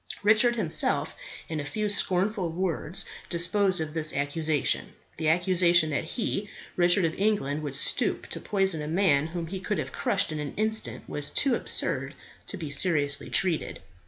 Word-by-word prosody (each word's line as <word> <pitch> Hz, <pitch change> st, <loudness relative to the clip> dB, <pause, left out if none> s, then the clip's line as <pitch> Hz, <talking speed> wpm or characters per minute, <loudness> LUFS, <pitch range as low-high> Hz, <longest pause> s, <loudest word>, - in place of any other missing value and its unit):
Richard 220 Hz, +3 st, +5 dB
himself 185 Hz, -9 st, +1 dB, 0.3 s
in 160 Hz, -1 st, -4 dB
a -, -, -3 dB
few 210 Hz, +9 st, -3 dB
scornful 195 Hz, -1 st, +1 dB
words 175 Hz, -1 st, -2 dB, 0.2 s
disposed 185 Hz, +2 st, +2 dB
of 155 Hz, -1 st, -4 dB
this 155 Hz, -1 st, -1 dB
accusation. 145 Hz, +1 st, 0 dB, 0.2 s
The 160 Hz, -1 st, 0 dB
accusation 175 Hz, -1 st, +3 dB
that 140 Hz, -, -1 dB
he, 205 Hz, +1 st, -3 dB, 0.3 s
Richard 175 Hz, +1 st, +3 dB
of 160 Hz, -, -1 dB
England, 195 Hz, -9 st, 0 dB
would 145 Hz, -3 st, -4 dB
stoop 140 Hz, -, +1 dB
to -, -, -5 dB
poison 190 Hz, -6 st, 0 dB
a 150 Hz, -, -5 dB
man 155 Hz, -4 st, +2 dB
whom 170 Hz, 0 st, -5 dB
he 190 Hz, +3 st, -5 dB
could 205 Hz, +2 st, -2 dB
have -, -, -4 dB
crushed -, -, +1 dB
in 155 Hz, -, -4 dB
an 150 Hz, -1 st, -5 dB
instant, 220 Hz, +1 st, -2 dB
was 145 Hz, -1 st, -2 dB
too 275 Hz, -3 st, +2 dB
absurd -, -, -1 dB, 0.3 s
to 200 Hz, -, -4 dB
be 155 Hz, -5 st, -6 dB
seriously 145 Hz, -2 st, +2 dB
treated. 175 Hz, -5 st, 0 dB
175 Hz, 165 wpm, -27 LUFS, 155-195 Hz, 0.3 s, Richard